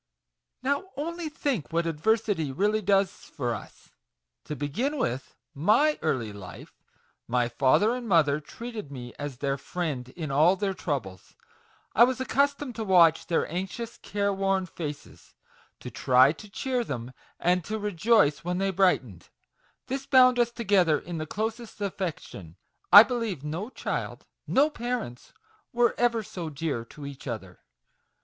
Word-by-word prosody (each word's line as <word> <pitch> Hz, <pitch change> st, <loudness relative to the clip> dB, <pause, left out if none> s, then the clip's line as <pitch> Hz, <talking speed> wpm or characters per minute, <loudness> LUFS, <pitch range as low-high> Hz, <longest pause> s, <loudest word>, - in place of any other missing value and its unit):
Now, 280 Hz, +8 st, -1 dB
only 335 Hz, +2 st, -4 dB
think 275 Hz, -, -2 dB
what 170 Hz, +1 st, 0 dB
adversity 165 Hz, -1 st, 0 dB
really 210 Hz, +9 st, +1 dB
does 195 Hz, -1 st, +3 dB
for 120 Hz, -3 st, -5 dB
us, 105 Hz, -, -10 dB, 0.5 s
To 150 Hz, -, -5 dB
begin 225 Hz, -, -2 dB
with 130 Hz, -, -3 dB, 0.2 s
my 215 Hz, -, +3 dB
early 120 Hz, -9 st, -1 dB
life: 95 Hz, -3 st, -11 dB, 0.5 s
my 120 Hz, 0 st, +1 dB
father 140 Hz, -, +3 dB
and 245 Hz, -1 st, -5 dB
mother 150 Hz, -5 st, +4 dB
treated 215 Hz, -, -8 dB
me 120 Hz, -3 st, -8 dB
as 145 Hz, -3 st, -5 dB
their 140 Hz, +1 st, -2 dB
friend 140 Hz, -6 st, -4 dB
in 155 Hz, +1 st, -6 dB
all 155 Hz, +7 st, +5 dB
their 195 Hz, 0 st, -1 dB
troubles; 130 Hz, -, -5 dB, 0.6 s
I 230 Hz, -, +7 dB
was 255 Hz, 0 st, -2 dB
accustomed 280 Hz, 0 st, 0 dB
to 225 Hz, -, -2 dB
watch 170 Hz, -5 st, +5 dB
their 170 Hz, -, +1 dB
anxious 190 Hz, +7 st, -5 dB
care 200 Hz, 0 st, -1 dB
worn 195 Hz, -1 st, 0 dB
faces, 150 Hz, -4 st, -8 dB, 0.5 s
to -, -, -7 dB
try 130 Hz, +2 st, +5 dB
to 210 Hz, +6 st, -11 dB
cheer 250 Hz, +4 st, -1 dB
them, 125 Hz, -, -5 dB, 0.3 s
and 180 Hz, 0 st, +2 dB
to 220 Hz, -, -3 dB
rejoice 205 Hz, -6 st, +2 dB
when 180 Hz, +1 st, -2 dB
they 195 Hz, +1 st, 0 dB
brightened: 170 Hz, -, +1 dB, 0.6 s
this 270 Hz, +1 st, -4 dB
bound 255 Hz, -2 st, +6 dB
us 240 Hz, -1 st, +3 dB
together 195 Hz, -9 st, +2 dB
in 165 Hz, +1 st, -6 dB
the 155 Hz, -, -4 dB
closest 220 Hz, +5 st, -4 dB
affection; 175 Hz, -, -5 dB, 0.4 s
I 205 Hz, -, +12 dB
believe 230 Hz, -, -3 dB
no 165 Hz, +9 st, -4 dB
child, -, -, -4 dB, 0.2 s
no 295 Hz, +3 st, +3 dB
parents, 240 Hz, -, -5 dB, 0.4 s
were 240 Hz, 0 st, +3 dB
ever 235 Hz, -2 st, +2 dB
so 175 Hz, -5 st, -6 dB
dear 145 Hz, -5 st, -3 dB
to 145 Hz, +4 st, -11 dB
each 140 Hz, 0 st, -9 dB
other. 95 Hz, -7 st, -6 dB
180 Hz, 150 wpm, -27 LUFS, 145-230 Hz, 0.6 s, I